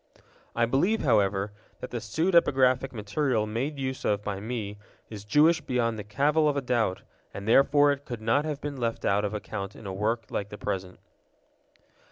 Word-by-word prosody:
I 115 - +3
believe, 160 - +1
however, 100 -4 +2 0.3
that 125 - -7
the 120 - -3
pseudepigraphic 135 - +2
material 110 +1 -1
made 125 +8 -3
use 130 -1 -4
of 105 0 0
by 100 -2 -3
me 105 -2 -5 0.3
is 105 -2 -7
Jewish 155 +9 +4
beyond 120 -5 -1
the - - -5
cavil 145 +8 +2
of 145 - -1
a - - +1
doubt, 115 -7 0 0.3
and 100 +1 -6
therefore 145 +4 +5
it 140 0 -4
could 120 -3 -6
not 115 +6 +2
have 150 -2 -3
been 145 -2 -5
left 115 -2 -2
out 100 +1 +2
of 105 +1 -2
account 100 0 -5
in 110 - -12
a 95 - -4
work 110 +4 -1
like 100 0 -3
the 105 - -8
present. 90 -2 -4
115 Hz, 185 wpm, -27 LUFS, 105-140 Hz, 0.3 s, therefore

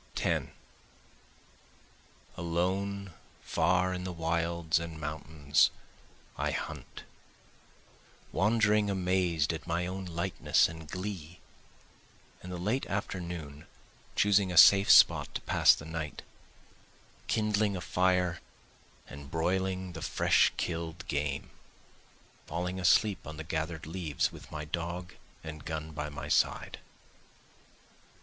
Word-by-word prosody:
10 - - 0 1.8
Alone 95 +3 -2 0.3
far 90 +2 +1
in 90 0 -4
the 95 - -4
wilds 85 0 0
and 85 -1 -7
mountains 75 -1 +1 0.7
I - - 0
hunt, - - -6 1.3
Wandering 105 +1 +3
amazed 90 -5 +1
at 80 +2 -7
my 85 +1 0
own 95 +1 -5
lightness 85 -1 +1
and 80 -1 -10
glee, 90 -3 -6 1.0
In 90 - -9
the 90 - -5
late 105 +10 -1
afternoon 85 -7 -5 0.5
choosing 100 -2 +3
a 90 - -3
safe 100 +3 +8
spot - - +6
to - - -2
pass - - +5
the 75 - -10
night, 80 -1 -5 1.0
Kindling 105 -2 +1
a - - -4
fire 90 -2 +1 0.7
and 70 -1 -10
broiling 95 +3 -1
the 80 - -7
fresh - - +3
kill'd 85 +1 -4
game, 70 -2 -2 1.0
Falling 90 +3 -3
asleep 100 +2 +3
on 80 - -7
the 80 - -5
gather'd 80 0 -3
leaves 80 -3 -1
with - - -13
my 75 -1 -5
dog 85 +3 -4 0.3
and 75 -2 -8
gun 80 +1 -5
by 75 0 -4
my 75 0 -7
side. - - +1
85 Hz, 115 wpm, -30 LUFS, 80-95 Hz, 1.8 s, safe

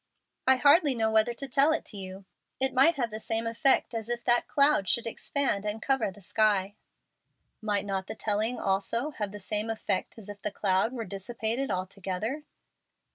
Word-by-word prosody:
"I 265 - +7
hardly 285 +2 +5
know 220 -1 +1
whether 220 +2 +2
to 275 - -6
tell 280 +3 +4
it - - -2
to 210 - -7
you. 190 0 -7 0.3
It 265 0 +1
might 270 +6 +5
have 240 -5 -2
the 215 - -5
same 225 +1 -1
effect 230 +2 +2
as 225 0 -4
if 240 0 -3
that 240 0 +3
cloud 280 -9 +3
should 235 - +1
expand 230 -2 -1
and 210 +1 -3
cover 265 -2 0
the 200 +2 -14
sky." 200 0 +1 0.9
"Might 210 -2 -1
not 195 -1 -3
the 220 - -6
telling 220 +3 -1
also 205 +8 0
have 210 -7 -4
the 205 - -8
same 210 +3 -1
effect 215 -3 -3
as 215 -3 -10
if 205 -1 -9
the - - -2
cloud 195 +2 0
were 235 -3 -5
dissipated 225 +6 -3
altogether?" 195 +7 -3
220 Hz, 185 wpm, -28 LUFS, 200-250 Hz, 0.9 s, I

